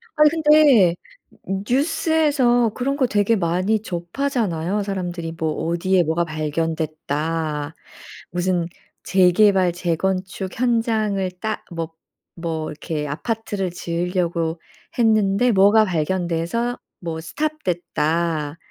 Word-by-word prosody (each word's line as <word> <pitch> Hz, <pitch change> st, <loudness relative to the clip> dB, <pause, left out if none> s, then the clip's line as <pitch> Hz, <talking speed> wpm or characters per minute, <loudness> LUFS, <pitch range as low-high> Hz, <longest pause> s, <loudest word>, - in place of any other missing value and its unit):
아니 300 Hz, 0 st, +6 dB
근데 300 Hz, -, +5 dB, 0.5 s
뉴스에서 260 Hz, -, +2 dB
그런 275 Hz, +2 st, -1 dB
거 260 Hz, -, +2 dB
되게 210 Hz, +1 st, +2 dB
많이 185 Hz, +4 st, 0 dB
접하잖아요, 195 Hz, -, -2 dB
사람들이. 175 Hz, -4 st, -4 dB
뭐 160 Hz, -1 st, -1 dB, 0.2 s
어디에 180 Hz, +2 st, +2 dB
뭐가 165 Hz, +2 st, 0 dB
발견됐다. 155 Hz, 0 st, -2 dB, 0.6 s
무슨 175 Hz, -1 st, 0 dB, 0.4 s
재개발, 185 Hz, -1 st, +4 dB
재건축 185 Hz, +2 st, -2 dB
현장을 220 Hz, -5 st, +1 dB
따 220 Hz, -1 st, -3 dB
뭐 165 Hz, -1 st, -4 dB, 0.4 s
뭐 165 Hz, -2 st, -3 dB
이렇게 150 Hz, 0 st, -4 dB
아파트를 205 Hz, +4 st, -3 dB
지으려고 170 Hz, -1 st, -2 dB, 0.4 s
했는데 220 Hz, 0 st, +3 dB
뭐가 205 Hz, +2 st, +5 dB
발견돼서 175 Hz, +7 st, -1 dB, 0.2 s
뭐 165 Hz, -2 st, -4 dB
stop 305 Hz, -, -3 dB
됐다. 165 Hz, -3 st, -1 dB
185 Hz, 240 characters per minute, -22 LUFS, 165-220 Hz, 0.6 s, 아니